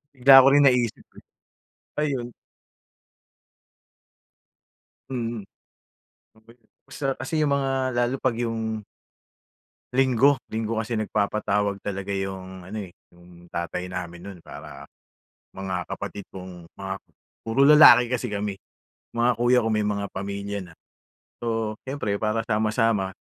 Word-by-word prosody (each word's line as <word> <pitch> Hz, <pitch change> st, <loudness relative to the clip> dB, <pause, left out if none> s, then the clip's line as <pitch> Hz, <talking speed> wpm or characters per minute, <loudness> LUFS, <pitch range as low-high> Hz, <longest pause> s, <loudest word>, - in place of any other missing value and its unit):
Bigla 135 Hz, +1 st, +9 dB
ko -, -, +5 dB
rin 145 Hz, +1 st, +6 dB
naisip 125 Hz, -3 st, +1 dB
eh. -, -, -14 dB, 0.8 s
Ayon. 130 Hz, -5 st, -2 dB, 2.8 s
Mhm. 120 Hz, -3 st, -3 dB, 0.9 s
Okey 110 Hz, +2 st, -21 dB
'yon. 115 Hz, -, -37 dB, 0.2 s
Masarap 135 Hz, 0 st, -2 dB
kasi -, -, -6 dB
'yong 150 Hz, -2 st, +2 dB
mga, 135 Hz, -1 st, 0 dB, 0.2 s
lalo 120 Hz, +1 st, +1 dB
pag 130 Hz, -2 st, 0 dB
'yong 115 Hz, -2 st, -2 dB, 1.1 s
Linggo, 130 Hz, +1 st, +4 dB, 0.2 s
linggo 110 Hz, 0 st, -2 dB
kasi 110 Hz, +1 st, -2 dB
nagpapatawag 105 Hz, -2 st, 0 dB
talaga 100 Hz, 0 st, -4 dB
'yung 95 Hz, -1 st, -5 dB
ano, 95 Hz, +5 st, -8 dB
eh, 95 Hz, -4 st, -7 dB, 0.2 s
'yung 85 Hz, 0 st, -18 dB
tatay 85 Hz, +2 st, -4 dB
namin 85 Hz, -1 st, -6 dB
no'n, 100 Hz, 0 st, -9 dB
para 70 Hz, -2 st, -10 dB, 0.7 s
mga 95 Hz, -2 st, -4 dB
kapatid 100 Hz, -1 st, -6 dB
kong 90 Hz, -2 st, -9 dB
mga 95 Hz, -1 st, -5 dB, 0.5 s
puro 135 Hz, +5 st, +3 dB
lalaki 150 Hz, -5 st, +8 dB
kasi 125 Hz, -2 st, -2 dB
kami. 100 Hz, -1 st, -2 dB, 0.5 s
Mga 120 Hz, +1 st, +2 dB
kuya 120 Hz, +1 st, +3 dB
ko 115 Hz, -2 st, +1 dB
may 105 Hz, -, +1 dB
mga 100 Hz, -1 st, -1 dB
pamilya 100 Hz, +1 st, -4 dB
na. -, -, -16 dB, 0.6 s
So, 115 Hz, -2 st, -2 dB
siyempre 130 Hz, -7 st, -2 dB
para 110 Hz, +2 st, 0 dB
sama-sama, 110 Hz, -2 st, +1 dB
110 Hz, 125 wpm, -25 LUFS, 95-120 Hz, 2.8 s, Bigla